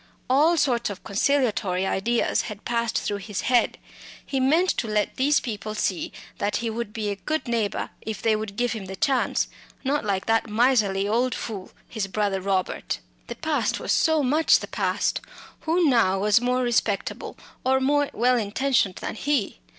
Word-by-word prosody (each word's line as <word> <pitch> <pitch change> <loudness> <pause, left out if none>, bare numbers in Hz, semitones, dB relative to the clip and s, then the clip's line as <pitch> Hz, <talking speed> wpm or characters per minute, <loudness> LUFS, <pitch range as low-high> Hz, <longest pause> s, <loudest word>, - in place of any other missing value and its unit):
All 310 +6 +4
sorts 245 -7 +1
of 200 -2 -8
conciliatory 205 -5 +1
ideas 230 +5 +1
had 210 -1 -9
passed 235 -1 0
through 205 - -1
his 200 0 -4
head. 240 0 +2 0.5
He 270 - -1
meant 315 +8 +3
to 230 - -2
let 210 -1 0
people 235 -6 0
see 190 -4 -1 0.3
that 205 +1 0
he 230 -1 -1
would 230 -1 -4
be 215 -1 -3
a - - -2
good 310 +5 -3
neighbour 230 -4 -1
if 220 -2 -5
they 225 -1 +2
would 215 -2 -5
give 245 +1 0
him 220 -4 -4
the 190 +1 -6
chance 265 +5 +1 0.4
not 285 +2 0
like 195 -2 -1
that 225 0 +1
miserly 210 -4 +2 0.3
fool, 200 -5 -6 0.2
his 215 -4 -3
brother 195 -1 -1
Robert. 190 -1 -1 0.3
The - - -5
past - - -1
was - - -2
so 315 -2 +3
much 300 +5 +4
past; - - 0 0.5
who 335 +1 +3
now 230 -8 +3
was 210 +3 +3
more 250 +1 +1
respectable 225 -4 -1 0.3
or 265 0 +3
more 285 +2 +2
well 250 +1 +2
intentioned 220 -2 +1
than - - -3
he? 270 -1 -1
225 Hz, 165 wpm, -25 LUFS, 205-265 Hz, 0.5 s, All